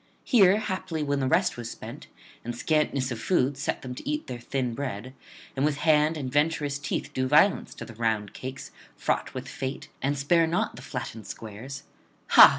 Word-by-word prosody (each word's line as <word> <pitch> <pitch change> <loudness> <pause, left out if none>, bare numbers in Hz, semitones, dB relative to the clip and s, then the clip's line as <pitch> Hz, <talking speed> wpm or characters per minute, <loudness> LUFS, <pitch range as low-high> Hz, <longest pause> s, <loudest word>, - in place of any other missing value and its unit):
Here 200 -5 +6
haply 185 -6 -2
when 145 -1 0
the 130 - +1
rest 130 - +2
was 120 -1 -5
spent, - - -8 0.4
and 120 +1 -4
scantness 140 -2 +1
of 120 - -3
food 140 0 +2
set 140 - -2
them 125 -1 -5
to 200 - -6
eat 300 +1 -1
their 125 - -6
thin 125 0 -2
bread, 130 -2 -4 0.4
and 135 - 0
with 150 -1 +2
hand 155 +1 +4
and 130 -4 -4
venturous 145 -1 +1
teeth 145 0 -3
do 130 -1 0
violence 155 +9 +4
to - - -7
the 115 - -10
round 110 -3 0
cakes 130 +1 -7 0.3
fraught - - -1
with - - -5
fate 130 +1 -5
and 140 +1 +1
spare 165 +4 +4
not 165 +2 0
the - - -9
flattened 110 -1 -6
squares: 115 +6 -7 0.5
_Ha! - - +11
140 Hz, 190 wpm, -27 LUFS, 125-155 Hz, 0.5 s, Ha